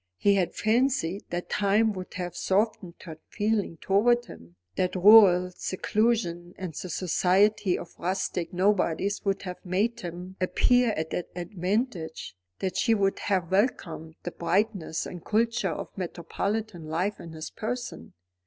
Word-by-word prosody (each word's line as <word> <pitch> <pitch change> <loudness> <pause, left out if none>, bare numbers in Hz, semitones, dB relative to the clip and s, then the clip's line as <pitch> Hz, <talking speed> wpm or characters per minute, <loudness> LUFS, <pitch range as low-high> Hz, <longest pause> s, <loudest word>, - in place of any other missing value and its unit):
He 200 - +4
had 185 -3 0
fancied 220 -5 +1
that 175 +1 -3
time 210 +2 +2
would 185 -2 -8
have 175 -2 -4
softened 190 -3 0
her 160 -3 -9
feeling 210 -5 -1
towards 240 +7 +2
him, 85 +1 -13 0.2
that 185 0 0
rural 185 -2 +7
seclusion 185 -2 -1
and 185 -4 -5
the 185 - -6
society 185 +3 +2
of 170 - -9
rustic 185 -1 -2
nobodies 195 0 +1
would 195 -1 -1
have 180 -2 -7
made 200 +6 0
him 180 +2 -7
appear 245 +6 +3
at 160 0 -3
an 175 - -2
advantage, 180 - -3 0.2
that 185 -1 -3
she 230 -2 +3
would 195 -2 +1
have 185 -4 -1
welcomed 170 - 0
the 175 - -4
brightness 180 -1 -1
and 175 -2 -8
culture 230 +2 +1
of - - -6
metropolitan 185 +1 -3
life 180 +6 -1
in 165 -1 -9
his 155 0 -7
person. 230 -6 -5
185 Hz, 145 wpm, -27 LUFS, 175-210 Hz, 0.2 s, rural